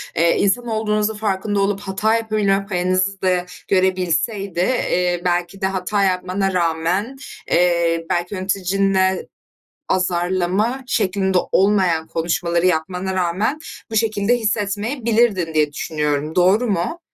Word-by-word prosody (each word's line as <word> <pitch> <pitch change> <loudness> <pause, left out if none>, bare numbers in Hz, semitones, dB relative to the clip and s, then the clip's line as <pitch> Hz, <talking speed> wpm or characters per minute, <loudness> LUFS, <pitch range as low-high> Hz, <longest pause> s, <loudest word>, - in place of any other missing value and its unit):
eee, 170 +1 +3
insan 240 +5 +1
olduğunuzun 215 -1 0
farkında 205 -1 -1
olup 195 0 0
hata 205 +3 0
yapabilme 210 -3 0
payınızı 185 +1 0
da 180 -1 +1 0.2
görebilseydi, 190 +1 0
eee, 180 -4 +1
belki 175 +2 -1
de - - +1
hata 195 +2 -1
yapmana 185 +1 0
rağmen, 175 +8 0 0.3
eee, 170 -1 +2
belki 175 +2 -1
yöneticinle 190 0 0 0.6
azarlama 185 +7 0
şeklinde 190 -4 +1
olmayan 185 -5 +2
konuşmaları 170 +1 0
yapmana 180 +2 -1
rağmen 190 - 0 0.3
bu 220 - -3
şekilde 215 +1 +2
hissetmeyebilirdin 215 - 0
diye 150 -1 +2
düşünüyorum. 150 0 -2
Doğru 190 +7 +3
mu? 200 - -2
190 Hz, 110 wpm, -20 LUFS, 175-205 Hz, 0.6 s, eee